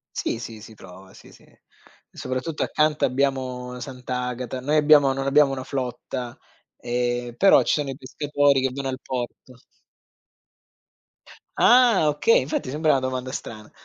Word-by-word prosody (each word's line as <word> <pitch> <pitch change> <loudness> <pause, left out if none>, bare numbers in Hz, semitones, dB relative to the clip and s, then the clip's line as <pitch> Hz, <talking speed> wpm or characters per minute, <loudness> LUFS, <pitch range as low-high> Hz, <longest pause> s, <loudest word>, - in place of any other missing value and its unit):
Sì, - - -2
sì, 115 -2 -9
si 110 0 -13
trova, 95 -1 -14
sì, - - -16
sì. - - -19 0.7
Soprattutto 130 +5 -4
accanto 150 0 +1
abbiamo 130 -2 -1
Sant'Agata, 125 0 -5
noi 145 +4 0
abbiamo 145 -2 +5
non 135 0 -3
abbiamo 140 0 +4
una 130 - -5
flotta, 125 -2 -5 0.4
ehm, 120 0 -2
però 195 +9 +5
ci - - +1
sono 145 -2 -1
i 135 - -5
pescatori 145 0 +1
che 130 - +1
vanno 135 0 -4
al 130 0 -5
porto. 125 0 -6 2.0
Ah, 240 -9 +5
okay, 150 +10 +3
infatti 130 0 -3
sembra 155 +1 -1
una 135 - +2
domanda 130 0 -4
strana. 110 -4 -8
130 Hz, 145 wpm, -23 LUFS, 125-145 Hz, 2.0 s, abbiamo